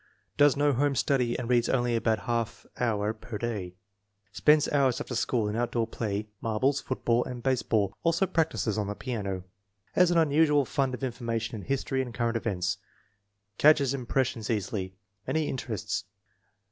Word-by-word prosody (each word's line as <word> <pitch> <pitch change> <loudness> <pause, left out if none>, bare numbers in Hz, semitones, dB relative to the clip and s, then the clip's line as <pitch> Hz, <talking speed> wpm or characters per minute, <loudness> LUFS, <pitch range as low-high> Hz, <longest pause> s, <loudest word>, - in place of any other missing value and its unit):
Does 145 -1 +5
no 145 0 +3
home 140 +2 +1
study 125 -2 +1
and 120 - -4
reads 120 -1 +2
only 120 -2 +1
about 115 -1 +2
a - - -11
half 115 -2 -2
hour 110 -3 0
per 110 0 -7
day. 100 -6 -4 0.6
Spends 150 +8 +4
hours 135 -4 +2
after - - -5
school 115 -2 0
in 105 - -2
outdoor 120 0 0
play, 105 -2 -3
marbles, 130 +6 +1
football, 120 -2 0
and 120 -2 -7
base 130 -2 +2
ball; 100 -3 +1
also 170 +3 +2
practices 160 - 0
on 105 - -1
the 105 - -3
piano. 100 -8 -4 0.5
Has 180 -1 +5
an 175 - +2
unusual 150 -2 +4
fund 135 0 0
of 130 - -10
information 115 -3 -2
in 105 - -8
history 135 -1 0
and 120 -3 -6
current 115 +1 0
events. 95 -4 -1 0.8
Catches 140 -3 +5
impressions 125 -3 -1
easily. 95 -3 -2 0.3
Many 160 -1 0
interests. 110 -6 -3
120 Hz, 165 wpm, -28 LUFS, 110-135 Hz, 0.8 s, Does